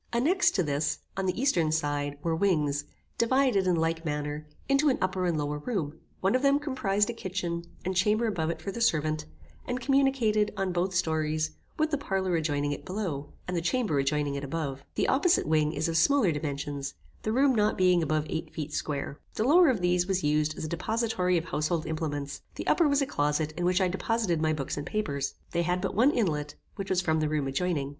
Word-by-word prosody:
Annexed 285 +11 +3
to 185 - +2
this, 145 0 0 0.2
on 190 0 -1
the 185 +4 -1
eastern 175 - +2
side, 145 -2 -1
were 165 -1 +1
wings, 150 -6 +1 0.3
divided, 235 -5 +3
in 180 - +3
like 165 0 0
manner, 150 -1 -3 0.2
into 275 +2 +4
an 260 - +2
upper 185 -1 0
and 170 -3 +1
lower 150 0 -2
room; 160 -5 -3 0.2
one 190 +3 +2
of 255 - +2
them 280 0 +4
comprized 240 -8 0
a - - -7
kitchen, 180 -5 -3 0.2
and 185 +1 -1
chamber 210 +5 +3
above 170 -8 -1
it 170 - -4
for 200 - -3
the 235 - -5
servant, 155 - +1 0.4
and 245 0 -2
communicated, 255 -6 +2
on 195 -2 0
both 180 +1 -1
stories, 155 -3 0 0.3
with 310 0 +1
the 295 - 0
parlour 190 -8 -1
adjoining 145 -3 0
it 145 - -5
below, 175 -8 -4 0.2
and 180 - -2
the 170 - 0
chamber 180 - +1
adjoining 145 +1 0
it 140 0 -4
above. 140 -2 -3
The - - +1
opposite 335 +7 +3
wing 155 -1 +2
is 170 - -1
of 165 0 0
smaller 225 +1 +4
dimensions, 140 -2 -4 0.3
the 215 - -1
rooms 265 +2 +3
not 210 0 +2
being 180 -2 +4
above 155 -1 0
eight 160 - -4
feet 150 -1 -5
square. 145 -1 -3 0.2
The 215 - 0
lower 325 +6 +6
of 230 -8 +1
these 180 0 +2
was 190 -1 0
used 150 +1 +1
as - - -4
a - - -3
depository 185 +1 0
of 165 - -2
household 155 -1 -1
implements, 145 -3 -3
the - - -5
upper 335 - +4
was 285 -1 +3
a - - 0
closet 150 - 0
in 175 - -1
which 180 +1 +3
I 190 - +3
deposited 185 -2 0
my 155 0 +2
books 145 -3 -3
and 145 - -4
papers. 145 -11 -2 0.2
They 170 - +1
had 180 +1 0
but 190 +1 -2
one 235 +8 +5
inlet, 155 - -1 0.2
which 195 -2 -5
was 185 -1 +2
from 160 -3 +1
the 155 -1 0
room 150 -2 0
adjoining. 140 0 -1
175 Hz, 215 wpm, -28 LUFS, 150-215 Hz, 0.4 s, lower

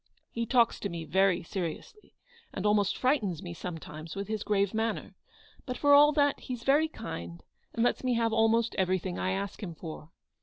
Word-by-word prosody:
He 230 0 -3
talks 240 -2 +3
to 200 - -3
me 170 -2 -5
very 190 +2 +2
seriously, 185 - -6 0.4
and 190 - -5
almost 205 -1 +2
frightens 220 - 0
me 175 -1 -6
sometimes 165 -2 -7
with 200 0 -5
his 215 -1 -2
grave 200 -1 +1
manner; 225 +1 -2 0.5
but, 250 -1 -3
for 285 -1 +4
all 295 +1 +8
that, 285 -1 +2
he's 245 -2 -6
very 290 +4 +4
kind, 85 - -7 0.3
and 230 - +1
lets 245 - +1
me 250 -1 +1
have 230 -1 +1
almost 225 +1 +3
everything 185 -1 0
I 185 - 0
ask 200 +2 -4
him 175 -5 -6
for. 155 -1 -8
205 Hz, 185 wpm, -29 LUFS, 175-235 Hz, 0.5 s, all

